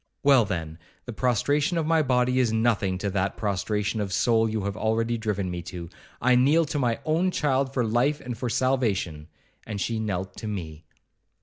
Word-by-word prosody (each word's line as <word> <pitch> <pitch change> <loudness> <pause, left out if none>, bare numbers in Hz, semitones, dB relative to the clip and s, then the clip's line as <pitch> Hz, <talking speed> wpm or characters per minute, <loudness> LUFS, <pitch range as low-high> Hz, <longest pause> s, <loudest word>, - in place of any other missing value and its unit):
—Well, 135 -5 +6
then, 85 -5 -4 0.3
the 120 - -6
prostration 140 - +1
of 165 - 0
my 160 0 +3
body 125 -2 +2
is 120 -3 +2
nothing 110 -4 +1
to 100 +2 -2
that 95 0 -1
prostration 105 +1 -1
of 100 -2 -3
soul 115 +2 +2
you 110 -2 -2
have 100 0 -3
already 115 +2 0
driven 105 -5 -2
me 90 0 -4
to. 85 -2 -8 0.3
I 125 +1 +3
kneel 145 +7 +4
to 145 - 0
my 120 -3 +1
own 165 +4 +2
child 135 -5 0
for 125 -3 0
life 125 +7 +1
and 125 -1 -6
for 125 +2 -3
salvation,' 115 - 0 0.4
and 105 -2 -5
she 110 +3 -1
knelt 95 -3 -3
to 110 - -6
me. 80 -6 -6
115 Hz, 190 wpm, -26 LUFS, 100-130 Hz, 0.4 s, Well